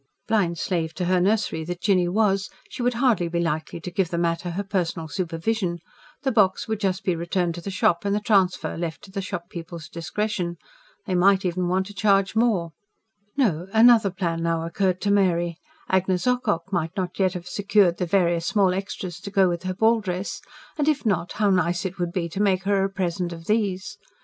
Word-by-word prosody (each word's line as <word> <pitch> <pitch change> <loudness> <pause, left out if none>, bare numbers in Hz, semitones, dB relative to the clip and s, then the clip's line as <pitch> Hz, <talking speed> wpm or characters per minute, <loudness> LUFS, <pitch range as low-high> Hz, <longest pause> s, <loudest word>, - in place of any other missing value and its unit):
Blind 195 -6 +1
slave 165 -2 -2
to 180 - -2
her 180 0 +2
nursery 200 -4 +1
that 175 +2 -5
Jinny 185 -2 +2
was, 195 0 +1 0.2
she - - -6
would 245 0 +1
hardly 230 -8 +2
be 170 0 -2
likely 165 0 -2
to 180 - -6
give 180 -1 0
the 170 - -2
matter 170 +1 0
her 185 +4 -3
personal 175 -5 -2
supervision: 175 +3 -2 0.5
the 265 - +1
box 200 -5 +2
would 220 -2 -2
just 190 -2 -1
be 180 - +1
returned 170 +1 -1
to 175 - -7
the 200 - -5
shop, 175 -2 +1
and 200 0 0
the - - +1
transfer 195 -4 +1
left 165 +2 -4
to 200 - -13
the 195 0 -3
shop 185 -1 -6
people's 170 -3 -7
discretion. 175 +1 -3 0.5
They 190 - -2
might 190 +2 +4
even 180 0 0
want 185 +2 +1
to 205 - -10
charge 195 -1 +2
more. 215 -8 +2 0.7
No, 185 - +1
another 225 -2 +6
plan 175 -3 -2
now 165 -1 0
occurred 185 +2 0
to 205 - +1
Mary. 175 -4 +2 0.3
Agnes 185 -1 +1
Ocock 215 -8 0
might 175 +2 -1
not 180 0 -3
yet 185 -2 +2
have 180 0 -6
secured 200 -3 +2
the 180 - -2
various 170 -2 +2
small 195 -3 +3
extras 185 -2 -5
to 200 +1 -7
go 195 -1 +4
with 175 -1 -2
her 185 0 -3
ball 225 +2 +3
dress; 185 -1 -4 0.4
and, 295 - +1
if 295 -4 +1
not, 190 -5 0
how 210 -2 +2
nice 175 0 +1
it 190 0 -4
would 175 -1 -1
be 175 -2 -2
to 190 +5 -3
make 190 -2 +2
her 195 -1 +2
a 195 - 0
present 180 -2 -2
of 165 -1 -9
these. 205 -1 -1
185 Hz, 210 wpm, -24 LUFS, 170-205 Hz, 0.7 s, another